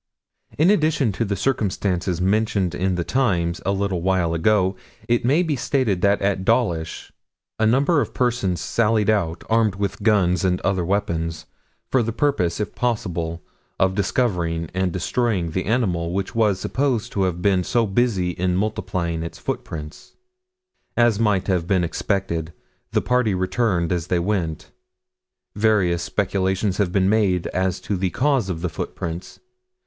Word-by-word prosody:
In 165 Hz, +6 st, +5 dB
addition 155 Hz, -, +2 dB
to 115 Hz, +4 st, -2 dB
the 100 Hz, -1 st, -1 dB
circumstances 95 Hz, -6 st, -1 dB
mentioned 100 Hz, -1 st, +1 dB
in 95 Hz, +1 st, 0 dB
the 85 Hz, -, -1 dB
Times 85 Hz, -9 st, 0 dB
a -, -, +3 dB
little 100 Hz, -3 st, -1 dB
while 90 Hz, -2 st, +1 dB
ago, 95 Hz, +2 st, +2 dB, 0.3 s
it 120 Hz, 0 st, +2 dB
may 145 Hz, +9 st, +3 dB
be 160 Hz, -4 st, 0 dB
stated 125 Hz, -, 0 dB
that 100 Hz, +1 st, +3 dB
at 100 Hz, -1 st, +1 dB
Dawlish 95 Hz, -8 st, 0 dB, 0.5 s
a 110 Hz, -, +3 dB
number 140 Hz, +7 st, +3 dB
of -, -, -3 dB
persons 120 Hz, -8 st, 0 dB
sallied 110 Hz, +4 st, +2 dB
out, 85 Hz, -6 st, -1 dB
armed 110 Hz, -3 st, +2 dB
with 100 Hz, 0 st, -3 dB
guns 100 Hz, -5 st, +2 dB
and 90 Hz, -1 st, +1 dB
other 95 Hz, -2 st, 0 dB
weapons, 85 Hz, -4 st, -2 dB, 0.5 s
for 130 Hz, -, +4 dB
the 115 Hz, 0 st, -1 dB
purpose, 110 Hz, -, 0 dB
if 105 Hz, -, -3 dB
possible, 85 Hz, -8 st, -2 dB, 0.4 s
of 95 Hz, 0 st, +3 dB
discovering 90 Hz, -6 st, -1 dB
and 95 Hz, 0 st, 0 dB
destroying 95 Hz, -1 st, -1 dB
the 95 Hz, +3 st, -2 dB
animal 95 Hz, -7 st, 0 dB
which 95 Hz, +3 st, -2 dB
was 105 Hz, -5 st, +2 dB
supposed 130 Hz, -3 st, -1 dB
to 100 Hz, -, -1 dB
have 90 Hz, -2 st, -2 dB
been 95 Hz, -3 st, +3 dB
so 115 Hz, +5 st, +1 dB
busy 100 Hz, -4 st, +1 dB
in 90 Hz, +1 st, -1 dB
multiplying 90 Hz, -4 st, -2 dB
its 85 Hz, -, -6 dB
footprints. 75 Hz, -2 st, -6 dB, 0.8 s
As 120 Hz, -3 st, +3 dB
might 105 Hz, -4 st, +2 dB
have 90 Hz, -4 st, 0 dB
been 95 Hz, -2 st, +2 dB
expected, 85 Hz, -2 st, -2 dB, 0.4 s
the -, -, +2 dB
party 125 Hz, -5 st, +1 dB
returned 95 Hz, -2 st, 0 dB
as 85 Hz, -2 st, -1 dB
they 90 Hz, -, +1 dB
went. 85 Hz, -4 st, -2 dB, 0.8 s
Various 100 Hz, -5 st, +2 dB
speculations 95 Hz, -1 st, 0 dB
have 100 Hz, -4 st, +1 dB
been 95 Hz, 0 st, +2 dB
made 100 Hz, -4 st, +2 dB
as 95 Hz, -1 st, -1 dB
to 100 Hz, -, -2 dB
the 95 Hz, 0 st, 0 dB
cause 130 Hz, -3 st, +1 dB
of 85 Hz, -3 st, -3 dB
the 90 Hz, -, -1 dB
footprints. 85 Hz, +2 st, -6 dB
95 Hz, 155 wpm, -22 LUFS, 90-110 Hz, 0.8 s, In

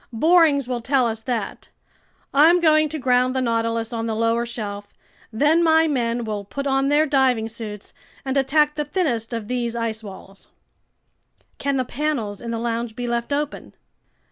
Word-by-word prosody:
"Borings 305 Hz, +1 st, +3 dB
will 245 Hz, -2 st, -3 dB
tell 260 Hz, +1 st, +2 dB
us 225 Hz, -1 st, -2 dB
that. 240 Hz, -1 st, -4 dB, 0.6 s
I'm 320 Hz, +5 st, +6 dB
going 310 Hz, -2 st, +3 dB
to 315 Hz, -, -3 dB
ground 255 Hz, -1 st, +2 dB
the -, -, +1 dB
Nautilus 230 Hz, -1 st, -1 dB
on 230 Hz, 0 st, -3 dB
the 220 Hz, -, -2 dB
lower 230 Hz, +1 st, 0 dB
shelf, 205 Hz, -3 st, -7 dB, 0.4 s
then 295 Hz, +9 st, +3 dB
my 320 Hz, 0 st, +4 dB
men 240 Hz, -4 st, -1 dB
will 210 Hz, -2 st, -4 dB
put 280 Hz, +8 st, -6 dB
on 270 Hz, 0 st, +1 dB
their 295 Hz, +2 st, +4 dB
diving 260 Hz, -6 st, +2 dB
suits 220 Hz, -2 st, -8 dB, 0.3 s
and 265 Hz, 0 st, -2 dB
attack 295 Hz, +2 st, +2 dB
the 300 Hz, 0 st, -2 dB
thinnest 280 Hz, -, -1 dB
of 230 Hz, -3 st, -4 dB
these 240 Hz, -1 st, -2 dB
ice 230 Hz, -1 st, -3 dB
walls." 195 Hz, -1 st, -12 dB, 1.1 s
"Can 280 Hz, -1 st, 0 dB
the 255 Hz, -, 0 dB
panels 240 Hz, -7 st, -3 dB
in 235 Hz, -, -6 dB
the 230 Hz, -, -2 dB
lounge 230 Hz, -1 st, -3 dB
be 245 Hz, -, -4 dB
left 235 Hz, +2 st, -2 dB
open?" 295 Hz, +1 st, -3 dB
245 Hz, 170 wpm, -22 LUFS, 230-285 Hz, 1.1 s, I'm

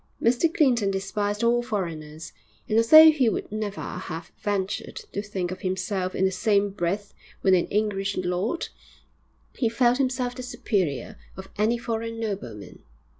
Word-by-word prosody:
Mr 250 Hz, +8 st, +2 dB
Clinton 245 Hz, -, +3 dB
despised 205 Hz, +2 st, -2 dB
all 240 Hz, +1 st, +3 dB
foreigners, 165 Hz, -8 st, -5 dB, 0.3 s
and 215 Hz, -, -1 dB
although 310 Hz, +8 st, +9 dB
he 270 Hz, -6 st, +2 dB
would -, -, -4 dB
never 210 Hz, -1 st, -4 dB
have 170 Hz, -2 st, -6 dB
ventured 200 Hz, -1 st, -2 dB, 0.2 s
to 200 Hz, -, -3 dB
think 190 Hz, -4 st, -4 dB
of 185 Hz, -, -7 dB
himself 185 Hz, 0 st, -2 dB
in 190 Hz, -, +2 dB
the 190 Hz, -, +2 dB
same 200 Hz, 0 st, +1 dB
breath 200 Hz, +1 st, -3 dB, 0.3 s
with 190 Hz, -, +5 dB
an 175 Hz, -2 st, +3 dB
English 200 Hz, -2 st, -1 dB
lord, 185 Hz, -, -1 dB, 0.8 s
he 235 Hz, -, 0 dB
felt 240 Hz, +2 st, +2 dB
himself 255 Hz, -2 st, 0 dB
the 255 Hz, -, -7 dB
superior 215 Hz, -, -2 dB, 0.2 s
of 190 Hz, 0 st, -9 dB
any 220 Hz, +3 st, +2 dB
foreign 230 Hz, -1 st, -4 dB
nobleman. 190 Hz, -, -6 dB
205 Hz, 150 wpm, -25 LUFS, 190-235 Hz, 0.8 s, although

